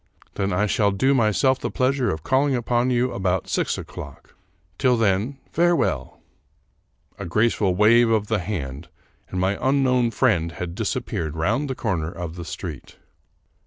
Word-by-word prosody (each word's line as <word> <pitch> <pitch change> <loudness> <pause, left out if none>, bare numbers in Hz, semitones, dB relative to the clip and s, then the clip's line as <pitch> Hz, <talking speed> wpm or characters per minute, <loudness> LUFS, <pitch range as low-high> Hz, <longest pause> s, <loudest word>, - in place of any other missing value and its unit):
Then 100 0 -1
I 95 +4 +1
shall 105 0 +2
do 115 +8 +2
myself 130 +2 +2
the - - -3
pleasure 130 -1 +1
of 80 -1 -3
calling 135 +1 +2
upon 120 +1 0
you 125 0 +1
about 95 -2 -1
six - - -1
o'clock. 70 -1 -10 0.5
Till 125 -3 +3
then, 110 +5 +1
farewell! 175 +1 +1 0.5
" - - -38
A - - -5
graceful 105 0 +1
wave 115 +4 +5
of 110 -2 +2
the 110 0 0
hand, 80 -7 -5 0.4
and 90 - -3
my 95 +2 0
un 135 +1 +3
known 125 -2 +2
friend 95 -10 +1
had 85 -1 -5
disappeared 80 -3 -3
round 115 - 0
the 130 - -2
corner 85 -9 -2
of 85 -1 -6
the 85 -1 -7
street. - - -7
105 Hz, 160 wpm, -23 LUFS, 90-125 Hz, 0.5 s, wave